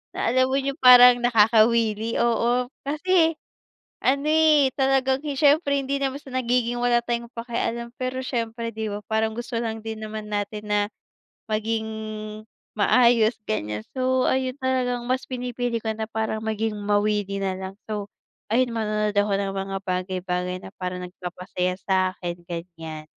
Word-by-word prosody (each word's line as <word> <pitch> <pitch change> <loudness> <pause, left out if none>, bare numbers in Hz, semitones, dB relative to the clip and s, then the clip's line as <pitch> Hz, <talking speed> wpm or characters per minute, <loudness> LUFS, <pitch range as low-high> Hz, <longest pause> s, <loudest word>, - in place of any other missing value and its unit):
na - - 0
alam 255 +1 +3
mo - - +2
yung 275 +1 -3
parang 250 -1 +9
nakakawili, 225 -1 +3
oo. 240 +1 +1 0.2
Kasi 330 +2 +2 0.7
ano, 280 +3 +1
eh, 310 -3 +5
talagang 265 -1 +2
siyempre 290 +1 +3
hindi 275 +1 -1
naman 275 +1 -2
sa 275 - -13
nagiging 245 -1 0
wala 240 -1 +3
tayong 235 0 -3
pakialam, 235 0 -3
pero 255 0 -3
siyempre 230 -2 -3
'di 220 -1 -4
ba 205 - -5
parang 220 0 +1
gusto 240 0 -4
lang 225 -1 -3
din 220 0 -6
naman 215 0 -6
natin 210 0 -4
na 210 - +3 0.7
maging 220 +1 -1 0.9
maayos, 235 +1 +4 0.2
ganyan. 105 0 -2 0.2
So, 255 0 +2
ayun 260 -1 0
talagang 250 -2 0
mas 255 +1 0
pinipili 245 -2 -2
ko 220 - -2
na 220 0 -4
parang 220 0 -2
maging 220 0 -1
mawili 205 -1 0
na 190 -1 -1
lang. 190 0 -6 0.2
So, 210 -1 -3 0.5
ayun 250 +1 +3
manonood 210 -1 -1
ako 205 0 +2
ng 195 -1 -2
mga 195 0 -3
bagay-bagay 180 0 -2
na - - -8
parang 180 0 -4
nagpapasaya 180 0 -4
sa'kin, 185 -2 0
ganyan. 165 -3 -7
225 Hz, 145 wpm, -24 LUFS, 205-255 Hz, 0.9 s, parang